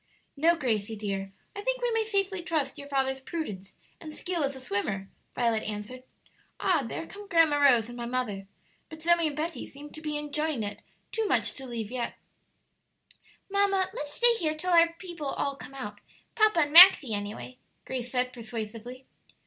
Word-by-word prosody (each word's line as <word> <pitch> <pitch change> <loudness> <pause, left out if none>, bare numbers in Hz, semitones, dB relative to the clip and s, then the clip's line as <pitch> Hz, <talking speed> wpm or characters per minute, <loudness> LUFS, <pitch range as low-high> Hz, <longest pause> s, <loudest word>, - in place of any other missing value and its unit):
"No, 330 +4 +4
Gracie 225 -7 -1
dear; 195 -2 -4 0.2
I 405 - -4
think - - 0
we - - 0
may 455 -1 +2
safely 395 -3 0
trust 315 -5 -2
your 280 - -8
father's 265 -1 0
prudence 215 - -6 0.3
and 315 - -8
skill 345 +1 -2
as 275 0 -1
a - - -8
swimmer," 200 -4 -2 0.3
Violet 230 -2 +1
answered. 215 +5 -6 0.6
"Ah, 350 -6 +2
there 235 +7 -5
come 405 +4 -11
Grandma 330 -5 +4
Rose 250 -6 +5
and 240 - -9
my 240 -1 -5
mother; 225 -6 -3 0.4
but 315 - -10
Zoe 340 -1 +4
and 295 -1 -5
Betty 325 +2 -3
seem 290 +1 -11
to 310 - -9
be 300 -1 -2
enjoying 295 -3 -1
it 205 0 -6 0.3
too 445 -1 -1
much - - +2
to 265 -1 -7
leave 230 -3 -5
yet." 250 -2 -3 1.3
"Mamma, 390 -1 +2
let's 295 -11 -4
stay 480 0 +6
here 310 -3 0
till 365 +4 -2
our 335 -1 +6
people 345 -6 -7
all 280 0 -2
come 275 0 -11
out; 210 -6 -7 0.3
papa 430 -6 +4
and 290 -1 0
Maxie, 335 - +9
any 205 +1 -3
way" 255 - -10 0.3
Grace 250 -2 -4
said, 250 0 0
persuasively. 230 +2 -7
280 Hz, 180 wpm, -28 LUFS, 235-340 Hz, 1.3 s, Maxie